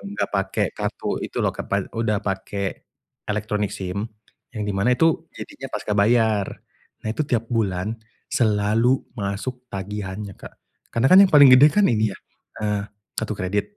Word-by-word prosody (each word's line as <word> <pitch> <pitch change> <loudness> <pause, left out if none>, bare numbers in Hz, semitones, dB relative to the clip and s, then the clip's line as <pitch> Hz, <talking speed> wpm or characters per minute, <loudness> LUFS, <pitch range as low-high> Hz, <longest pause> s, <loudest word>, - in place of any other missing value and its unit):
nggak - - -1
pake 100 -1 0
kartu - - -4
itu - - -5
loh - - 0
kepan 100 -1 -2
udah 110 -3 0
pakai 100 0 -3 0.7
elektronik 105 -1 -1
SIM, 95 +2 -4 0.5
yang 110 -3 -4
di 105 - -1
mana 120 +6 +2
itu 165 -1 +2
jadinya - - -9
pasca 105 - -3
bayar. 110 -1 +2 0.5
Nah - - -2
itu 155 - -1
tiap 115 -2 0
bulan 105 -3 -1 0.3
selalu 115 +1 +2
masuk 120 +5 -4
tagihannya, 100 0 -5
Kak, - - -12 0.4
karena 115 +3 +1
kan 190 - +10
yang 195 - +5
paling 145 -2 +8
gede 140 +4 +9
kan 205 +6 +3
ini 110 -2 +2
ya, - - -20 0.5
eee, 105 -1 0 0.3
kartu 110 -1 -2
kredit. 105 - -2
105 Hz, 155 wpm, -23 LUFS, 100-120 Hz, 0.7 s, kan